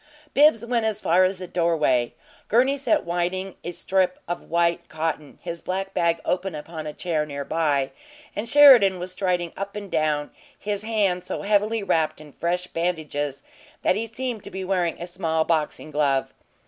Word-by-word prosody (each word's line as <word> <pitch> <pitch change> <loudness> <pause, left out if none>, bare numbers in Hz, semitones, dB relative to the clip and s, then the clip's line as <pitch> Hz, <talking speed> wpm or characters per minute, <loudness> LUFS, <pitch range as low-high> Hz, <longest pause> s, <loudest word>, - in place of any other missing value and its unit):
Bibbs 285 -6 +5
went 235 -1 0
as 220 -2 -1
far 185 -1 +4
as 185 +1 0
the 185 - -6
doorway. 160 -9 +1 0.3
Gurney 255 +5 +3
sat 290 +2 +1
winding 180 +2 -2
a - - -4
strip 185 +1 0
of 175 - -3
white 170 0 +1
cotton, 155 -2 -3
his 170 -1 -5
black 195 +1 -3
bag 170 -1 +1
open 180 -1 -1
upon 155 +1 -7
a - - -3
chair 160 -3 -1
near 140 -2 -5
by; 145 -4 +1 0.4
and 220 +3 -3
Sheridan 245 -9 +8
was 180 +1 -5
striding 180 -2 -1
up 200 +1 -5
and 205 -2 -7
down, 150 -1 0 0.3
his 205 -1 -3
hand 205 -5 0
so - - -5
heavily 210 +2 +1
wrapped 160 -5 +1
in 150 -1 -13
fresh 175 +2 -1
bandages 155 -5 -3 0.4
that - - +3
he 225 +2 -2
seemed 235 -1 -4
to - - -7
be 190 +1 -5
wearing 180 -3 0
a 175 - -4
small 165 -3 -1
boxing 155 -1 -1
glove. 140 -2 +1
180 Hz, 175 wpm, -24 LUFS, 160-200 Hz, 0.4 s, Sheridan